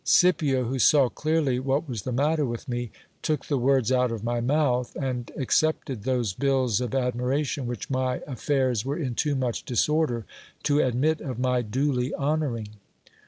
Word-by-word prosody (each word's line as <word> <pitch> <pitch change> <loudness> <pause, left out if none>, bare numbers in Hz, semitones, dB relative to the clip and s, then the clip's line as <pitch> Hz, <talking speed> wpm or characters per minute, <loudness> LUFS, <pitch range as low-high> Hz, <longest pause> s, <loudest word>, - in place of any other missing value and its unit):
Scipio, 150 -8 +3
who 130 +3 -2
saw 135 0 +5
clearly 155 -4 0
what 135 +4 0
was 120 -6 -4
the 130 - -4
matter 150 +5 +1
with 120 +1 -4
me, 120 -2 -3 0.3
took 155 -2 -1
the 140 -3 0
words 130 -1 +2
out 125 -2 +2
of 115 -2 -4
my 120 0 -1
mouth, 125 -2 +1
and 125 -3 -3
accepted 135 -4 0
those 125 -6 0
bills 130 -3 +1
of 125 0 -3
admiration 130 +2 -1
which 120 0 -5
my 130 -1 0
affairs 130 -2 0
were 140 +4 -2
in 135 -8 -2
too 145 +4 0
much 125 -3 -1
disorder 125 -2 +1 0.4
to 145 0 +2
admit 135 +6 +1
of 130 -6 -5
my 125 0 +1
duly 125 +3 -1
honouring. 140 -7 -1
130 Hz, 165 wpm, -26 LUFS, 120-145 Hz, 0.4 s, saw